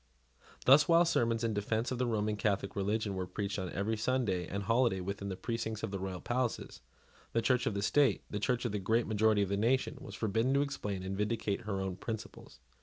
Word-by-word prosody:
Thus, 140 +3 +7
while 170 +1 +6
sermons 115 -7 +1
in 115 -1 0
defence 110 +4 -1
of 125 - -2
the 125 - +1
Roman 105 -2 0
Catholic 100 -2 -1
religion 105 +1 -1
were 95 -1 -3
preached 100 +1 -3
on 95 -1 -3
every 105 +5 -1
Sunday 105 -6 0
and 100 +1 -3
holiday 115 -1 +2
within 100 +2 -4
the 95 - -3
precincts 110 -1 -3
of - - -2
the 100 - -3
royal 95 -1 -4
palaces, 120 -1 -2 0.5
the 115 - +2
Church 125 +1 +2
of 100 - -1
the 100 - -1
state, 135 -2 +3
the 105 - -4
Church 125 +3 0
of 120 - 0
the 105 - -2
great 110 +5 +1
majority 110 -1 +3
of 95 - -3
the 100 - 0
nation, 125 +5 +1
was 100 - -8
forbidden 115 +6 +1
to 140 - +4
explain 105 -9 -4
and 95 +1 -3
vindicate 105 +1 -1
her 100 -2 -2
own 95 -1 -3
principles. 110 - -7
110 Hz, 220 wpm, -32 LUFS, 100-120 Hz, 0.5 s, Thus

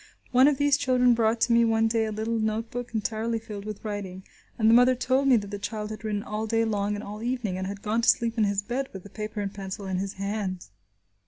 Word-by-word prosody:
One 255 +2 +6
of 295 -2 +3
these 285 0 +3
children 255 -3 +3
brought 225 0 +2
to 235 - +3
me 235 0 +5
one 225 -1 +3
day 225 0 +1
a 215 - -3
little 220 +2 -2
note 220 +1 -1
book 245 0 -5
entirely 220 +2 -1
filled 210 -2 -8
with 215 0 -7
writing, 195 -3 -5 0.3
and 220 - +2
the 225 - +6
mother 250 +2 +6
told 260 +2 +1
me 260 - +6
that 205 -3 -1
the 205 - -4
child 215 0 -4
had 215 - -8
written 210 -2 -2
all 215 +1 -3
day 225 +1 +2
long 205 -1 -1
and 205 - -6
all 210 +1 -7
evening, 240 -5 -2
and 190 0 -3
had 200 0 -7
gone 220 +2 +1
to - - +3
sleep 230 -1 +2
in 220 -3 +3
his 200 0 0
bed 260 +5 -3
with 190 -2 -8
the 200 - -13
paper 215 -1 -5
and 200 0 -4
pencil 195 0 -6
in 190 -1 -2
his 195 0 -3
hand. 195 -2 -3
220 Hz, 260 wpm, -26 LUFS, 205-235 Hz, 0.3 s, One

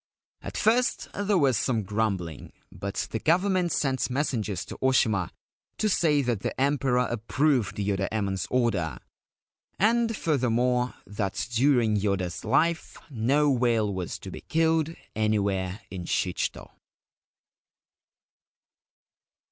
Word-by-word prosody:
At - - -6
first 245 +3 +2
there 205 0 +1
was 135 -8 +3
some 115 -3 0
grumbling; 95 -6 -2 0.2
but 100 0 -4
the 110 - -2
Government 180 - +2
sent 135 -3 0
messengers 115 - -1
to - - -8
Oshima 110 -8 +2 0.5
to 215 - +1
say 155 -7 +2
that 120 -4 0
the - - -4
Emperor 135 -2 +2
approved 125 +1 0
Yoda 100 -1 0
Emon's 100 -3 -1
order, 115 -10 0 0.8
and 230 +1 +2
furthermore, 125 -4 +1
that 100 -1 -3
during 120 -3 +3
Yoda's 95 -3 -1
life 160 +9 +1
no 140 +5 +2
whale 115 -5 +1
was 90 -2 -4
to - - -9
be - - -8
killed 160 0 +1 0.2
anywhere 100 -2 0
in 90 -2 -6
Shichito. 90 +1 -2
120 Hz, 115 wpm, -27 LUFS, 100-145 Hz, 0.8 s, was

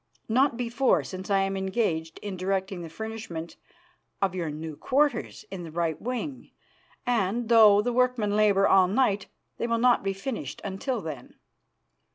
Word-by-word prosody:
Not 255 +2 +2
before, 245 +2 +2
since 185 +1 -7
I 195 -1 +3
am 195 0 -1
engaged 190 -5 -1
in 205 -2 -4
directing 190 0 -2
the 165 - -7
furnishment 210 -4 -6 0.6
of 195 -2 +1
your 175 -4 -2
new 155 +1 -6
quarters 280 - 0
in 190 -2 -5
the 165 - -7
right 165 -1 -2
wing, 255 +3 -4 0.6
and, 230 -1 0
though 215 -3 +7
the 245 - -1
workmen 245 -4 +1
labour 205 -2 +4
all 190 -1 +5
night, 205 -1 +1 0.3
they - - -1
will 230 0 +1
not 245 +1 +4
be 195 0 -1
finished 220 +5 -5
until 205 +5 -3
then. 150 -6 -8
200 Hz, 160 wpm, -27 LUFS, 185-235 Hz, 0.6 s, though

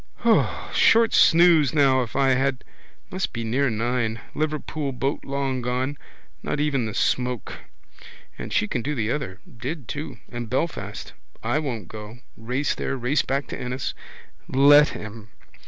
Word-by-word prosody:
Short 230 0 +5
snooze 165 -4 +5
now 135 -3 +4
if 120 - -5
I 135 -1 +3
had. 130 0 +1 0.5
Must 190 0 -2
be 115 -1 -3
near 130 +5 +1
nine. 115 0 -1
Liverpool 155 -1 -2
boat 135 +3 -2
long 135 -2 -2
gone. 125 +3 -1 0.5
Not 150 - -2
even 140 -6 +1
the 105 - -6
smoke. 125 -2 -1 0.8
And - - -7
she 105 - +1
can 120 - -2
do 150 +5 -2
the 115 -2 -1
other. 100 -11 -4
Did 130 +4 -6
too. 145 -4 -5
And 120 -2 -5
Belfast. 150 +6 -3 0.3
I 120 +7 +1
won't 130 -8 -4
go. 110 +1 -9 0.2
Race 125 +6 -1
there, 135 - -3
race 130 +4 +1
back 140 +1 -1
to - - -6
Ennis. 125 +1 -3 0.6
Let 145 +3 +7
him. 110 0 -8
130 Hz, 150 wpm, -24 LUFS, 120-145 Hz, 0.8 s, Let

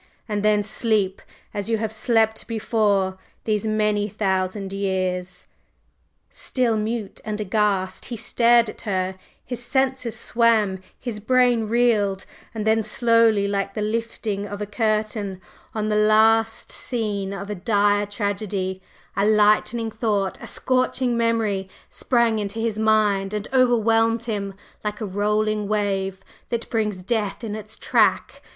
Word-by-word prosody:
and 210 -2 -1
then 210 0 +3
sleep! 210 -3 0 0.3
as 205 +1 -4
you 225 - +2
have 220 0 -2
slept 220 0 +1
before, 205 -4 0 0.2
these 215 -1 0
many 210 -1 +1
thousand 190 -1 -1
years!" 185 -2 -2 0.9
Still 245 -4 0
mute 215 -1 -3
and 215 0 -4
aghast 205 -2 0
he 240 - -5
stared 235 +1 +3
at 215 - -8
her; 190 -3 -1 0.3
his 245 -1 -5
senses 260 -2 0
swam, 220 -5 +2 0.2
his 230 -4 -5
brain 245 0 +3
reeled, 215 -4 +2 0.3
and 215 -2 -4
then 220 0 +3
slowly, 225 -2 +3
like 195 -1 -2
the 215 - -2
lifting 215 -2 -2
of 205 0 -6
a 210 - -2
curtain 215 -2 -1 0.4
on 215 0 -1
the 210 - +1
last 220 +1 +3
scene 210 -5 -2
of 200 +1 -5
a - - -1
dire 205 +1 +2
tragedy, 200 -2 -3 0.3
a 200 - +1
lightning 215 +2 +3
thought, 210 -3 -1
a - - -7
scorching 255 -1 0
memory, 225 -5 0 0.2
sprang 235 -3 +1
into 205 +1 -4
his 225 -1 -1
mind 210 -2 +2
and 210 0 -3
overwhelmed 230 -2 +3
him 200 -4 -3 0.3
like 210 -1 -3
a 220 - -3
rolling 210 +1 0
wave 195 -2 -1 0.3
that 235 -1 -3
brings 210 -5 -1
death 215 +1 -2
in 215 -2 -3
its 215 0 -7
track. - - +1
215 Hz, 140 wpm, -23 LUFS, 200-225 Hz, 0.9 s, then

